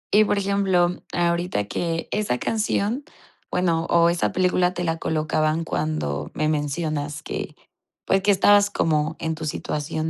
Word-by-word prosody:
Y, 215 0 +6
por 205 - +1
ejemplo, 190 -3 +1
ahorita 170 - 0
que 165 +9 -3
esa 210 -12 0
canción, 220 - -1 0.5
bueno 165 -2 +1
o 170 0 +5
esa 175 - 0
película 180 -1 +2
te 175 - -2
la 165 -1 -1
colocaban 155 0 0
cuando 75 - -2
me 155 - 0
mencionas 150 0 -2
que - - -5 0.5
pues, 195 0 +2
que 205 - 0
estabas 205 +1 +5
como 160 -3 0
en 160 -1 -2
tu 160 0 -6
situación 155 +2 -3
165 Hz, 150 wpm, -23 LUFS, 155-185 Hz, 0.5 s, Y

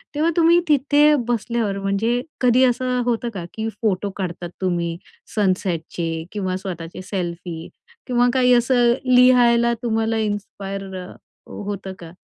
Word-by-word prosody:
तेव्हा 315 +3 +2
तुम्ही 335 +1 +5
तिथे 295 +1 +4
बसल्यावर 230 -3 -1
म्हणजे 205 +5 0 0.2
कधी 250 0 +4
असं 250 0 +1
होतं 240 0 -1
का? 180 -4 -5
की 220 0 -3
फोटो 205 -2 0
काढतात 175 -2 -4
तुम्ही 170 -2 -1 0.4
सनसेटचे 170 -4 -1
किंवा 190 -3 -2
स्वतःचे 175 -3 -7
सेल्फी 175 -3 -5 0.4
किंवा 245 0 +3
काही 250 -1 +4
असं 240 0 +4 0.2
लिहायला 240 -2 +5
तुम्हाला 225 -1 0
इन्स्पायर 200 -2 -4
हो 185 +2 -11
होतं 200 -1 -5
का? 165 -1 -10
210 Hz, 125 wpm, -21 LUFS, 185-245 Hz, 0.4 s, तुम्ही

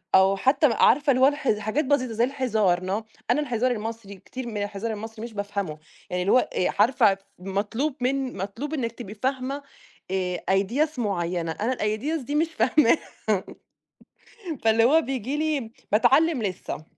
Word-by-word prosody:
أو 190 +1 +5
حتى 275 +7 +4
عارفة 290 +5 +4
اللي 255 -1 +2
هو 265 - +8
اله 275 -7 0
حاجات 215 +9 0
بسيطة 255 -4 +1
زي 230 +2 +1
الهزار، 220 -9 +1
no، 190 +4 -2 0.3
أنا 300 - +2
الهزار 250 -3 0
المصري 220 -3 -5
كتير 255 +6 -8
من 220 -3 -5
الهزار 205 +2 -4
المصري 220 +1 -7
مش 235 -1 -7
بافهمه، 200 -6 -3 0.3
يعني 180 0 -1
اللي 185 - +1
هو 255 - +4
آآ، 180 - 0
عارفة 235 -5 +5
ف - - -23 0.2
مطلوب 205 +10 -2
من 260 -1 -1
مطلوب 215 +11 -5
إنِك 245 -7 -1
تبقي 230 -3 -9
فاهمة 260 +4 -2 0.5
آآ، 180 -2 -1
ideas 250 +10 +1
معيّنة، 175 -6 -1
أنا 220 +10 -1
الideas 245 +9 -1
دي 290 - -3
مش 320 +2 +3
فاهماها، 255 +3 +4 1.7
فاللي 225 0 +4
هو 300 +7 +5
بييجي 265 -2 -3
لي 300 -7 -1 0.2
باتعلم 270 +6 +4
لِسّه. 185 -5 -4
230 Hz, 165 wpm, -25 LUFS, 200-270 Hz, 1.7 s, هو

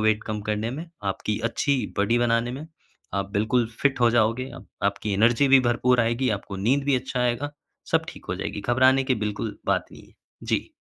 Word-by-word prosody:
Wait 110 0 +2
कम 110 -1 -3
करने 105 +2 -1
में, 155 +6 -6 0.2
आपकी 100 +1 -2
अच्छी 140 +4 0 0.2
बॉडी 110 +4 +2
बनाने 120 0 +1
में। 140 +5 -7 0.5
आप 100 0 -2
बिल्कुल 110 +3 +1
फ़िट 140 -3 +2
हो 120 -1 +5
जाओगे, 120 +3 +1 0.3
आपकी 100 +1 0
एनर्जी 120 +7 +3
भी 135 -1 +7
भरपूर 120 +1 +2
आएगी, 120 +3 +1
आपको 100 0 -8
नींद 130 +8 +1
भी 140 -1 +2
अच्छा 125 0 -3
आएगा। 125 +3 0 0.4
सब - - +2
ठीक - - -10
हो - - -1
जाएगी। 105 - -4
घबराने 130 +4 +3
की 130 - +2
बिल्कुल 105 +1 -3
बात - - +1
नहीं - - -14
है। - - -24 0.3
जी। - - -1
120 Hz, 195 wpm, -25 LUFS, 105-130 Hz, 0.5 s, भी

